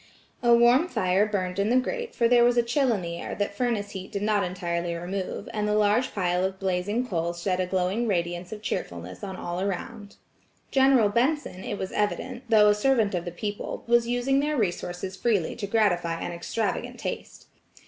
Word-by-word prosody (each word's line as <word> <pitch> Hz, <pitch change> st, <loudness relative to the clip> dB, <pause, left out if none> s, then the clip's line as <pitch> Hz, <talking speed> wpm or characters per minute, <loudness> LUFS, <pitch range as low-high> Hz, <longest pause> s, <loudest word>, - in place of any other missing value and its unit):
A 240 Hz, -1 st, +3 dB
warm 240 Hz, +7 st, +6 dB
fire 190 Hz, -, +2 dB
burned 185 Hz, -2 st, -2 dB
in 200 Hz, +2 st, +1 dB
the 245 Hz, -, +3 dB
grate 475 Hz, -, -2 dB
for 235 Hz, -, +3 dB
there 240 Hz, 0 st, +5 dB
was 245 Hz, 0 st, +3 dB
a 240 Hz, -, +5 dB
chill 255 Hz, +2 st, +1 dB
in 200 Hz, -5 st, -1 dB
the 170 Hz, 0 st, -5 dB
air -, -, -5 dB
that 205 Hz, 0 st, -2 dB
furnace 215 Hz, -4 st, -1 dB
heat 190 Hz, -1 st, -7 dB
did 200 Hz, -, -3 dB
not 210 Hz, -1 st, +2 dB
entirely 175 Hz, -2 st, -2 dB
remove, 185 Hz, +4 st, -4 dB
and 210 Hz, -1 st, -1 dB
the 210 Hz, -, +1 dB
large 215 Hz, +4 st, +2 dB
pile 180 Hz, -2 st, +1 dB
of 190 Hz, 0 st, -1 dB
blazing 195 Hz, +5 st, -1 dB
coals 170 Hz, -5 st, -2 dB
shed 185 Hz, +1 st, -1 dB
a 185 Hz, -, 0 dB
glowing 190 Hz, +5 st, 0 dB
radiance 175 Hz, -2 st, -2 dB
of 215 Hz, -1 st, -7 dB
cheerfulness 85 Hz, -, -5 dB
on 190 Hz, -2 st, -5 dB
all 175 Hz, 0 st, -4 dB
around. 200 Hz, +2 st, -4 dB, 0.6 s
General 265 Hz, -5 st, +5 dB
Benson, 240 Hz, -, 0 dB
it 205 Hz, -, -4 dB
was 190 Hz, -, -4 dB
evident, 240 Hz, +4 st, -2 dB
though 210 Hz, -2 st, +6 dB
a -, -, +6 dB
servant 220 Hz, -1 st, +2 dB
of 175 Hz, -1 st, -2 dB
the 175 Hz, -, -4 dB
people, 205 Hz, +4 st, -5 dB
was 235 Hz, 0 st, +3 dB
using 245 Hz, +3 st, +1 dB
their 295 Hz, +1 st, 0 dB
resources 180 Hz, -2 st, -2 dB
freely 200 Hz, -4 st, 0 dB
to 200 Hz, -, -4 dB
gratify 175 Hz, -6 st, +1 dB
an -, -, -4 dB
extravagant 195 Hz, +5 st, -3 dB
taste. -, -, -6 dB
205 Hz, 200 wpm, -26 LUFS, 180-235 Hz, 0.6 s, warm